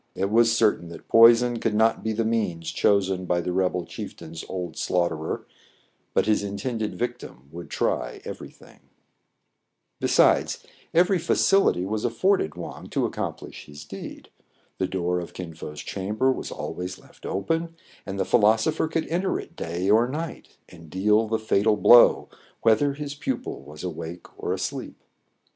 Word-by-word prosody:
It 100 +2 -1
was 115 +1 +5
certain 110 -7 +2
that 85 - -11
poison 115 +1 +6
could 110 -2 0
not 110 +1 +2
be 110 - -1
the 110 +1 -1
means 105 -8 -1
chosen 95 -2 +1
by 90 0 +1
the 90 +1 -2
rebel 90 -1 0
chieftain's 80 0 -8
old 90 -4 -5
slaugh 90 -1 +1
terer, 80 0 -4 0.7
but - - +3
his 105 -1 +2
intended 105 +2 -3
victim 120 - -5
would 85 +1 -9
try - - -1
every - - -7
thing. - - -19 1.2
Besides, - - +3 0.3
every 180 +2 +3
facility 165 - +3
was 105 +2 -2
afforded 120 - +1
Wang - - -8
to - - 0
accomplish - - -5
his 75 0 -11
deed. - - -9 0.5
The 95 - +1
door 90 -1 -1
of 85 - -8
Kin 90 -3 -6
Fo*s 75 -2 -8
cham 100 +2 -4
ber 130 +4 +3
was - - -4
always 90 +1 -5
left - - -21
open; 165 - -2 0.3
and 100 0 -6
the - - +1
philosopher 110 +7 +3
could 160 0 -2
enter 180 +3 0
it 170 - -11
day 90 - -3
or 110 +4 +5
night, 160 +4 -6
and 80 -2 -14
deal 105 +5 +2
the 110 +1 0
fatal 110 -1 +2
blow, 110 +5 +7 0.4
whether 115 +6 +4
his 145 -1 -5
pupil 145 - -4
was 75 +3 -11
awake 85 -1 -6
or - - -4
asleep. - - -4
105 Hz, 160 wpm, -25 LUFS, 90-115 Hz, 1.2 s, blow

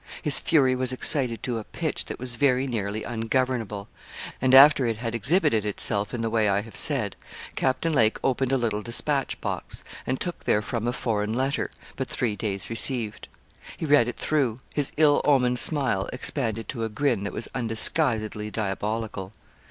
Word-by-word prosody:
His 150 -4 +3
fury 135 -5 +3
was 130 0 -1
excited 130 -2 +2
to 120 -3 -2
a - - -7
pitch - - -4
that - - -7
was 125 0 -3
very 130 +1 +1
nearly 110 -4 -3
ungovernable; 115 -3 -2 0.5
and 130 0 +4
after 140 -1 +7
it 115 -2 -2
had 115 0 -4
exhibited 115 - +3
itself 105 0 +1
in 120 - -4
the 115 - -1
way 110 -2 +2
I 100 +1 +1
have 115 +1 -13
said, 125 -10 +1 0.4
Captain 135 +5 0
Lake 110 -6 +2
opened 135 0 0
a 135 - +3
little 110 -4 -2
despatch 135 +4 0
box, - - -4 0.2
and 130 - -1
took 175 -1 -6
therefrom 110 +2 -1
a - - +1
foreign 110 -4 -2
letter, 135 +4 -1 0.3
but 130 - -3
three 115 -4 -2
days 100 -2 -2
received. 115 -2 0 0.5
He - - -4
read 145 -6 +4
it 120 - -5
through: 130 -6 -1
his 145 -2 0
ill 150 -2 +4
omened 125 -4 +3
smile 130 -11 +2
expanded 115 -4 -2
to 115 - -4
a 110 - -2
grin 115 -2 -1
that 100 - -4
was 110 - -5
undisguisedly 110 -2 +2
diabolical. 105 -1 -4
120 Hz, 175 wpm, -25 LUFS, 110-135 Hz, 0.5 s, after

